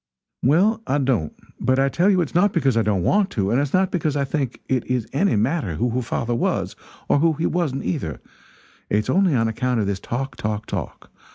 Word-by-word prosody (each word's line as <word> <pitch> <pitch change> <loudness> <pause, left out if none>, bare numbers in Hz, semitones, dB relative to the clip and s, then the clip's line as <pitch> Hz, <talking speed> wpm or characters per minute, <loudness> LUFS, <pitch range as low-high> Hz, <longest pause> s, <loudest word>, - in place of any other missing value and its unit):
"Well, 195 - +3
I 140 - +1
don't; 125 - 0 0.2
but 130 +2 +1
I 135 0 +3
tell 175 +8 +2
you 185 -3 +3
it's 165 - -3
not 195 +3 +3
because 135 -8 +2
I 115 - +3
don't 100 -5 0
want 200 - +2
to 100 -1 +1
and 125 +4 +3
it's 145 -1 -2
not 185 0 +2
because 155 -5 -1
I 140 -1 +1
think 135 -3 -2
it 130 -3 0
is 125 -3 0
any 185 +8 +2
matter 110 - 0
who 120 +7 0
her 125 +2 0
father 120 0 -2
was 120 - -1 0.3
or - - +3
who 165 +1 +3
he 160 +2 -2
wasn't, 155 -6 -1
either; 80 - -3 0.7
it's 105 +1 +1
only 185 -5 +3
on 115 -2 +2
account 125 +2 -1
of 105 - +1
this 100 -1 -2
talk, 130 +5 -4
talk, 105 0 -3
talk. - - -6
135 Hz, 220 wpm, -22 LUFS, 115-165 Hz, 0.7 s, Well